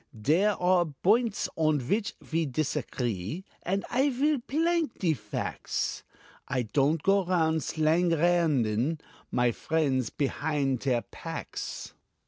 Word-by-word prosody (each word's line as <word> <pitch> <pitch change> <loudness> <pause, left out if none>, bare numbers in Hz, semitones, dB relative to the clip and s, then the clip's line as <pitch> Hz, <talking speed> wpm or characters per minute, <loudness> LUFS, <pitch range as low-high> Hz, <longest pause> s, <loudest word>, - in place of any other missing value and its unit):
Dere 175 - +3
are 180 -1 +3
boints 205 - +1
on 155 -2 +2
vhich 205 - -1
ve 165 -1 -1
tisagree, 125 - -2 0.2
And 195 +3 -1
I 270 +3 +3
will 280 +3 +1
plank 325 +2 0
de 170 -4 +2
facts - - -3 0.5
I 125 -2 0
don't 145 +6 +1
go 195 0 +4
round 160 -3 +1
slanganderin 160 -5 +2 0.3
My 125 -1 +2
friendts 135 -4 0
pehind 140 -2 -1
deir 125 -3 0
packs. - - -6
160 Hz, 110 wpm, -28 LUFS, 135-190 Hz, 0.5 s, go